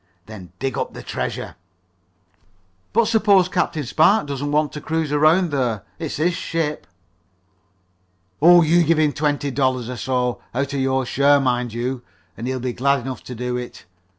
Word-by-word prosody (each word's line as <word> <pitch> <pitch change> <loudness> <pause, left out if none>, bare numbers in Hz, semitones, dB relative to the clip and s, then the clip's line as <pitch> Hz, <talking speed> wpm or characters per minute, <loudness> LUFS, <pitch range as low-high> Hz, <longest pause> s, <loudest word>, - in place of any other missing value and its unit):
Then 100 -5 -11
dig 135 -2 -3
up - - -3
the - - -8
treasure." - - -5 1.3
"But 230 +1 +3
suppose 210 -4 +4
Captain 180 -4 -1
Spark 160 - +3
doesn't 145 0 -4
want 150 0 +1
to 150 - -6
cruise 160 -1 -2
around 155 +4 +3
there? 120 -7 -1 0.2
It's 160 -3 -4
his 170 +4 +1
ship." 150 - -3 1.5
"Oh, 175 +2 +7
you 170 +2 +4
give 165 0 +2
him 150 -2 +2
twenty 145 -1 -1
five 130 - -8
dollars 130 -3 0
or 125 - -6
so 125 -1 -1
out 140 +2 -1
of 140 - -1
your 130 0 0
share, 140 +3 +3
mind 125 -3 0
you 120 +2 -3 0.3
and 115 - -6
he'll 130 0 -2
be 125 0 -3
glad 140 +2 +1
enough 130 +1 -6
to 125 - -7
do 125 +1 -3
it. 125 0 -8
140 Hz, 175 wpm, -21 LUFS, 125-160 Hz, 1.5 s, Oh